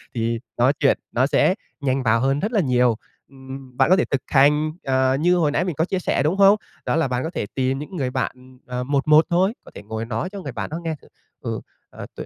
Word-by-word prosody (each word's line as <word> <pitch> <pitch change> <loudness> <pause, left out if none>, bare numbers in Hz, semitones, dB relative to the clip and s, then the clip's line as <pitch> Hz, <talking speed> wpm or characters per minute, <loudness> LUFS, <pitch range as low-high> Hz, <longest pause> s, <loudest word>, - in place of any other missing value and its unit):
thì 115 0 -1 0.2
nói 130 +4 +4
chuyện 140 - +3
nó 125 +2 +2
sẽ 180 - +3 0.3
nhanh 135 -1 0
vào 115 0 +3
hơn 135 +1 +1
rất 210 +8 -2
là 215 - +2
nhiều. 125 -4 +2 0.3
Ừm, 130 -1 -11
bạn 135 - +4
có 185 - +7
thể 190 - +1
thực 140 - -1
hành, 150 +2 +3
ờ, 130 0 +2
như 175 +3 +3
hồi 155 -4 +2
nãy 160 - +1
mình 175 -5 -3
có 160 +4 +1
chia 190 0 -2
sẻ, 175 - 0
đúng 165 +6 +1
không? 200 +1 +7 0.3
Đó - - 0
là 165 -4 +2
bạn 125 0 -2
có 160 - -2
thể 170 - -3
tìm 130 0 0
những 150 +6 -8
người 135 -5 -1
bạn, 130 0 -5
ờ, 125 0 -3
1:1 145 +3 +4
thôi, 185 +4 +2
có - - -15
thể 100 - -9
ngồi 110 +2 -5
nói 115 +7 -3
cho 200 0 -8
người 140 -6 -6
bạn - - -5
đó 160 - -4
nghe 160 -1 -2
thử: - - -19 0.3
"Ừ, 115 -3 -3 0.3
ờ, - - -9
tôi - - -6
135 Hz, 255 wpm, -22 LUFS, 125-160 Hz, 0.3 s, có